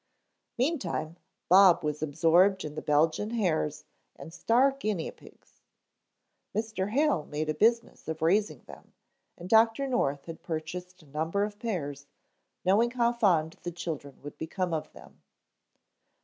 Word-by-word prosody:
Meantime 210 - -1 0.3
Bob 185 -1 +6
was 150 0 -2
absorbed 165 +6 +3
in 150 - -6
the 155 - -5
Belgian 160 +7 +1
hares 175 -10 -1 0.3
and 165 - -11
star 240 +9 +3
guinea 215 -11 -3
pigs. - - -20 0.9
Mr. 215 -3 -2
Hale 275 - +1
made 155 +1 -3
a - - +1
business 230 +8 +1
of 160 0 -4
raising 200 +6 +1
them - - -15 0.4
and 175 - -9
Dr. 225 +5 +4
North 145 - -1
had 165 -1 -9
purchased 175 +2 -6
a - - -19
number 160 +7 -1
of 205 0 -5
pairs, 145 - -4 0.6
knowing 210 +6 +4
how 240 -1 +1
fond 175 -9 +1
the 175 - -5
children 155 -5 -6
would 145 - -10
become 175 +2 -3
of 155 - -3
them. - - -16
180 Hz, 140 wpm, -28 LUFS, 155-220 Hz, 0.9 s, Bob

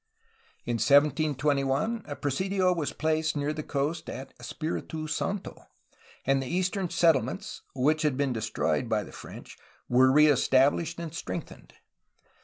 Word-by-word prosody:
In 120 -1 -1
1721 145 - +2
a 145 - -5
presidio 185 +7 0
was 165 -5 -2
placed 155 0 0
near 145 +1 -1
the 155 - -4
coast 150 +3 -2
at 135 +1 -7
Espfritu 155 +4 -4
Santo, 190 +5 -4 0.6
and 135 0 +2
the 130 - -5
eastern 185 +3 -1
settlements 160 -8 +1
(which 150 +4 +2
had 150 -5 +1
been 140 -2 0
destroyed 110 -1 -1
by - - +1
the - - -12
French) - - -11 0.3
were 130 +1 +5
reestablished 145 +3 +4
and 165 -2 -6
strengthened. 170 -1 -7
150 Hz, 130 wpm, -28 LUFS, 135-165 Hz, 0.6 s, were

